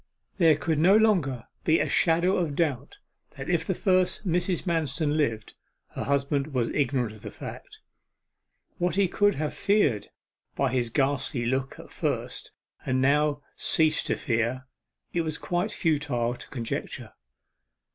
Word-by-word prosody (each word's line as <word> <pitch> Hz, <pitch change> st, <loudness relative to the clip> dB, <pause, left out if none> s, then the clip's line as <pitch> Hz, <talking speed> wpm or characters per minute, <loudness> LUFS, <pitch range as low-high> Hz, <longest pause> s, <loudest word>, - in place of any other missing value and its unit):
There 165 Hz, -3 st, +6 dB
could 155 Hz, +1 st, 0 dB
no 190 Hz, +6 st, +6 dB
longer 165 Hz, -, +2 dB, 0.2 s
be 160 Hz, 0 st, +4 dB
a -, -, +1 dB
shadow 170 Hz, +3 st, +3 dB
of 160 Hz, -5 st, -1 dB
doubt 145 Hz, -, -1 dB, 0.4 s
that -, -, -4 dB
if -, -, 0 dB
the -, -, 0 dB
first 185 Hz, 0 st, +1 dB
Mrs. 175 Hz, 0 st, 0 dB
Manston 155 Hz, -3 st, 0 dB
lived, 115 Hz, -8 st, -1 dB, 0.4 s
her -, -, -5 dB
husband 140 Hz, 0 st, 0 dB
was 120 Hz, -2 st, +1 dB
ignorant 130 Hz, -5 st, 0 dB
of 110 Hz, -1 st, -13 dB
the -, -, -7 dB
fact. -, -, -10 dB, 1.0 s
What 180 Hz, +1 st, 0 dB
he 200 Hz, -1 st, +3 dB
could 205 Hz, +2 st, +2 dB
have 150 Hz, +1 st, -2 dB
feared 175 Hz, -, +1 dB, 0.5 s
by 135 Hz, -2 st, +1 dB
his 125 Hz, -2 st, 0 dB
ghastly 135 Hz, -1 st, 0 dB
look 130 Hz, +2 st, -1 dB
at -, -, -12 dB
first, -, -, -3 dB, 0.3 s
and 130 Hz, -1 st, 0 dB
now 145 Hz, +3 st, +4 dB
have 145 Hz, -1 st, -4 dB
ceased 155 Hz, -1 st, +2 dB
to -, -, +1 dB
fear, 120 Hz, +2 st, -1 dB, 0.5 s
it 175 Hz, -, +1 dB
was 155 Hz, -2 st, -3 dB
quite 180 Hz, +4 st, -1 dB
futile 145 Hz, -8 st, 0 dB
to -, -, -9 dB
conjecture. 120 Hz, -4 st, -5 dB
150 Hz, 155 wpm, -27 LUFS, 130-170 Hz, 1.0 s, There